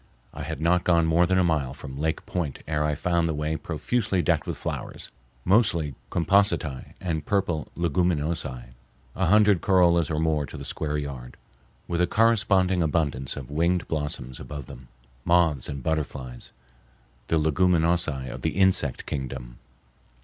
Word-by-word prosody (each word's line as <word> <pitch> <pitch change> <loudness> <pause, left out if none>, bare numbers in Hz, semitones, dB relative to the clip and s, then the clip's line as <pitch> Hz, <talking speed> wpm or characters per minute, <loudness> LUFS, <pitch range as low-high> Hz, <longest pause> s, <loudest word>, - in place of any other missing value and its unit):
I - - -7
had - - -5
not 85 +3 +2
gone 85 -2 +3
more 85 +2 +3
than 95 +1 +2
a 95 - +4
mile 75 -6 0
from 65 0 -8
Lake 80 +1 -1
Point 80 -7 -3
ere 75 -1 0
I 75 -1 0
found 85 +2 +1
the 80 - -1
way 75 +1 -1
profusely 95 +4 -1
decked - - +1
with - - -3
flowers, - - -6 0.3
mostly 85 - +3 0.2
compositae 85 - +1
and 80 -4 -2
purple 90 -5 0
leguminosae, 80 -7 -1 0.4
a 95 - +1
hundred 105 -1 +5
corollas 85 -4 +4
or 80 - -1
more 80 -3 +1
to - - -9
the - - -7
square 75 -1 -2
yard, 70 -4 -6 0.5
with 85 0 -1
a 90 - +3
corresponding 95 -4 +3
abundance 75 -5 0
of 70 -1 -8
winged 85 +4 +1
blossoms 75 -5 -4
above 75 -3 -7
them, 65 +1 -12 0.4
moths 85 -7 +2
and 70 -3 -5
butterflies, 70 -6 -3 0.8
the 80 - +2
leguminosae 80 -3 +2
of - - -7
the - - -2
insect 95 -9 +2
kingdom. 65 -3 -5
80 Hz, 155 wpm, -26 LUFS, 70-90 Hz, 0.8 s, hundred